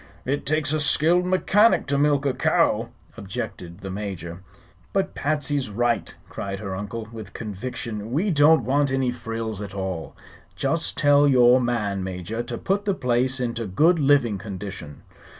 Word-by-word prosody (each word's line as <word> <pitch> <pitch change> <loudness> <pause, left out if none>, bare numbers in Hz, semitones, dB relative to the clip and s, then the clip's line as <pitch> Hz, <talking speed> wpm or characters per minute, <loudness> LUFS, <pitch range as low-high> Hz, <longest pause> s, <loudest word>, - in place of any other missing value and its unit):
"It 140 +1 -2
takes 155 -1 +1
a 155 - +1
skilled 165 +4 +3
mechanic 205 +4 +3
to 140 - -1
milk 145 -1 +2
a 135 - +2
cow," 130 - +1 0.3
objected 90 -1 -6
the 95 - -6
Major. 95 -4 -6 0.5
"But 195 -1 0
Patsy's 145 -3 -1
right!" 120 +3 -1
cried 100 0 -5
her 100 -3 -5
uncle, 105 +3 -5
with 110 -5 -9
conviction. 110 0 -6
"We 180 +10 +1
don't 150 -3 +5
want 140 +2 +2
any 135 -2 +1
frills 115 -3 -5
at 100 -1 -7
all. 95 -4 -5 0.4
Just 165 +4 0
tell 145 -1 +5
your 125 -1 +5
man, 105 -6 -1
Major, 95 +4 -4
to 120 0 -5
put 200 +2 -1
the 200 -2 +1
place 125 0 +1
into 115 -2 -2
good 160 - +3
living 135 -8 +3
condition." 95 -7 -8
120 Hz, 155 wpm, -24 LUFS, 100-145 Hz, 0.5 s, don't